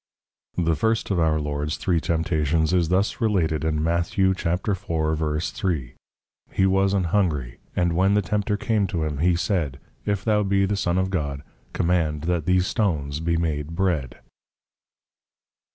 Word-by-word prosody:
§ 85 - +1
The 80 0 +2
first 110 +7 0
of 95 - +1
our 80 -1 +2
Lords 75 0 -2
three 85 -3 +1
Temptations 80 -1 +1
is 85 -3 +2
thus 95 +6 +1
related, 85 -9 +1
in 75 -1 0
Mat. 85 +1 +1
4.3. 85 - -1 0.6
_He 95 - +3
was 95 +1 +3
an 95 - +2
Hungry; 80 -9 0 0.2
and 85 -1 +1
when 95 +4 +3
the 105 - +2
Tempter 105 +1 0
came 105 -2 +1
to 85 -3 -2
him, 75 -2 -3
he 90 +2 +3
said, 85 -6 -1 0.2
If 100 -2 -1
thou 105 -1 +3
be 100 -1 +2
the 100 +2 0
Son 90 -2 0
of 95 0 0
God, 70 -6 -2 0.3
Command 80 -4 +1
that 85 -2 -1
these 90 0 +3
Stones 75 -10 -1
be 85 +1 0
made 80 -1 -2
Bread. 85 -10 -1
85 Hz, 155 wpm, -24 LUFS, 80-95 Hz, 0.6 s, He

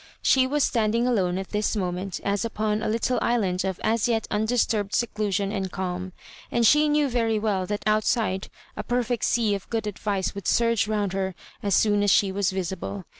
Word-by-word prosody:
She 260 -1 +4
was 290 +1 +1
standing 230 0 +1
alone 190 -8 +1
at 190 0 -5
this 210 +1 -1
moment 185 -1 -3
as 200 +1 0
Vpon 215 -1 -1
a - - 0
little 230 +3 0
island 195 -7 +1
of 190 -2 -3
as 225 +1 +1
yet 225 -2 0
undisturbed 215 -2 0
seclusion 205 -4 -1
and 190 -3 -3
calm, 185 0 -4 0.4
and 235 -1 +1
she 300 +5 +5
knew 295 -1 +2
very 230 -3 0
well 205 -4 -1
that 205 +1 -3
outside 215 -2 +1 0.3
a - - -3
perfect 245 -1 -1
sea 225 -3 +2
of 195 -1 -5
good 225 -2 -2
advice 205 -2 -2
would 200 -3 -6
surge 230 -3 +2
round 210 -3 -1
tier 190 -1 -2 0.3
as 200 -3 +1
soon 205 -1 +3
as 205 - +2
she 195 0 +4
was 195 -1 0
visible. 175 - -4
210 Hz, 190 wpm, -25 LUFS, 190-230 Hz, 0.4 s, she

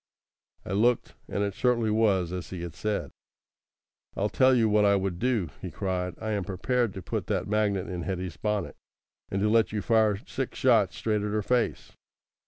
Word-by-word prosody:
I - - -6
looked, 115 +5 +2
and 100 - -1
it 100 -1 -1
certainly 115 0 +1
was 100 -6 +2
as 90 -1 -5
he 90 -2 -6
had 85 -2 -6
said. 105 +4 -2 1.0
"I'll 105 +2 0
tell 130 +2 +4
you 115 -2 +3
what 105 0 +3
I 100 0 +5
would 95 -3 -1
do," 115 - 0
he - - -5
cried. 90 -2 -3
"I 110 0 -3
am 100 -2 -1
prepared 110 +5 -1
to 95 - -6
put - - -3
that - - -1
magnet 100 -2 0
in 90 -2 -4
Hetty's 90 -1 -4
bonnet, 105 +3 -2 0.5
and 95 - -1
to - - +3
let 110 -2 +3
you 105 -1 -2
fire 110 -3 +3
six - - -4
shots - - +3
straight 105 -2 0
at 105 - -2
her 105 0 -1
face. 125 +1 0
105 Hz, 190 wpm, -27 LUFS, 95-110 Hz, 1.0 s, I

